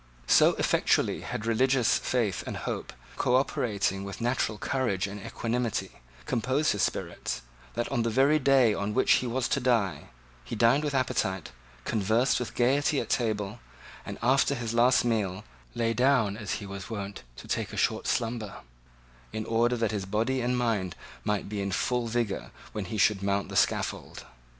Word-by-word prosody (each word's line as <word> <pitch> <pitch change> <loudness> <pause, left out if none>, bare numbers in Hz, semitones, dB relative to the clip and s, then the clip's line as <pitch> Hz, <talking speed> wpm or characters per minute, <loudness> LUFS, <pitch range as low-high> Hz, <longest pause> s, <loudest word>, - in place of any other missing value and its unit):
So - - +6
effectually - - +1
had 110 - -5
religious 125 +1 +3
faith 115 -6 -1
and - - -4
hope, - - -4 0.3
co 125 -1 +2
operating 100 -7 0
with 100 0 -7
natural 120 -3 0
courage 120 -5 -1
and 100 +1 -7
equanimity, 120 -1 -2 0.3
composed 130 +6 +1
his 105 - -1
spirits, - - -2 0.3
that, 120 +1 -1
on 130 -4 +1
the 115 - 0
very 135 +6 +4
day 130 -5 +4
on 105 +1 -2
which 130 - +3
he 125 - -3
was 120 +1 0
to - - +1
die, 120 -7 +1 0.4
he - - -6
dined 120 +6 +4
with 145 -2 -1
appetite, 95 - -1 0.3
conversed 110 +5 +2
with 125 - -5
gaiety 140 +4 +2
at - - -4
table, 110 -2 -1 0.4
and, - - -7
after 135 +3 +3
his 115 -3 -3
last 120 +2 +4
meal, 105 -4 -1 0.3
lay 115 -1 +1
down, 125 -4 +3
as 105 -2 -4
he 105 - -4
was 95 -2 -7
wont, 100 -2 -5
to 65 - -11
take - - -2
a - - -7
short - - 0
slumber, 115 -3 -2 0.7
in 110 0 -4
order 120 +2 +2
that 115 -1 0
his 100 -3 -3
body 115 +7 0
and 125 +1 0
mind 110 -7 0 0.3
might 105 -2 -1
be 100 0 -3
in 100 0 -2
full 125 +5 0
vigour 115 -3 -2 0.2
when 105 -2 -4
he 110 +4 -4
should 105 -1 +3
mount 100 0 0
the - - -6
scaffold. - - 0
115 Hz, 175 wpm, -28 LUFS, 105-125 Hz, 0.7 s, So